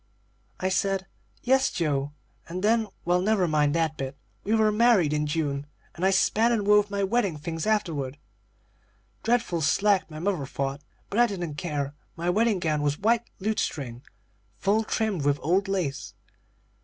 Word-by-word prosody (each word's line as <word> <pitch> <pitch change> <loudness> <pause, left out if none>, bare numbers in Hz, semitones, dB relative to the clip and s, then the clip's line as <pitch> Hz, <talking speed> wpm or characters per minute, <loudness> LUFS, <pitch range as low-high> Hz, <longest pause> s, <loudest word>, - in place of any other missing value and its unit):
"I 185 - 0
said 195 0 0 0.4
'Yes, 265 +1 +3
Joe,' 145 -4 -1 0.4
and 180 +3 -4
then 220 +1 +3 0.2
well, 175 +1 +2
never 200 -2 +2
mind 150 -1 +2
that 160 -2 0
bit; 135 0 -5 0.3
we 215 +3 +1
were 215 -1 +3
married 210 -8 +4
in 150 0 0
June, 145 -2 -2 0.3
and 175 - -7
I 190 - +5
spun 220 +4 +3
and 220 -4 0
wove 210 0 +4
my 200 0 -1
wedding 195 -5 +1
things 165 +4 -4
afterward. 155 -11 -1 1.0
Dreadful 230 -8 +1
slack, 195 +5 +2
my 155 - -9
mother 170 -5 -1
thought, 140 +1 -3 0.3
but 210 - 0
I 240 - +6
didn't 175 -7 -4
care. 145 -2 -3 0.2
My 175 +1 0
wedding 220 +1 +2
gown 155 -4 0
was 145 0 0
white 230 +3 +1
lutestring, 145 - -2 0.6
full 205 - +2
trimmed 215 -8 -1
with 145 0 +2
old 185 +5 +2
lace. 175 -8 -3
180 Hz, 160 wpm, -26 LUFS, 150-210 Hz, 1.0 s, I